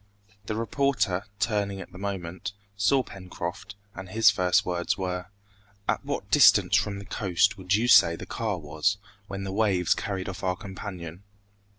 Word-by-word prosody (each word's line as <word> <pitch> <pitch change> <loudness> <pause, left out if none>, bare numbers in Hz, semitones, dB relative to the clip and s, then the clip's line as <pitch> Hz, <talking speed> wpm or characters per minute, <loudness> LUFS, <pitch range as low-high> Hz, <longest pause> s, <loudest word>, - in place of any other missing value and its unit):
The 110 - -2
reporter, 110 -5 0
turning 100 -3 0
at 95 - -9
the 90 - -11
moment, 95 -2 -4 0.2
saw 115 +7 +3
Pencroft, 90 0 -7 0.2
and 95 -1 -8
his 110 0 +5
first 90 -3 +2
words 90 -1 -1
were, 90 -1 -3 0.6
"At - - 0
what - - -4
distance - - +6
from 100 -1 +1
the 100 - -8
coast 100 -1 +1
would 95 0 0
you 115 +3 +1
say 85 -8 +7
the - - -8
car 110 -4 -2
was, 80 +5 -1 0.3
when 100 -1 -5
the 95 0 -4
waves 100 -5 +2
carried 95 -2 -4
off 95 0 -6
our 90 -1 +1
companion?" 95 -3 -8
95 Hz, 165 wpm, -27 LUFS, 90-105 Hz, 0.6 s, say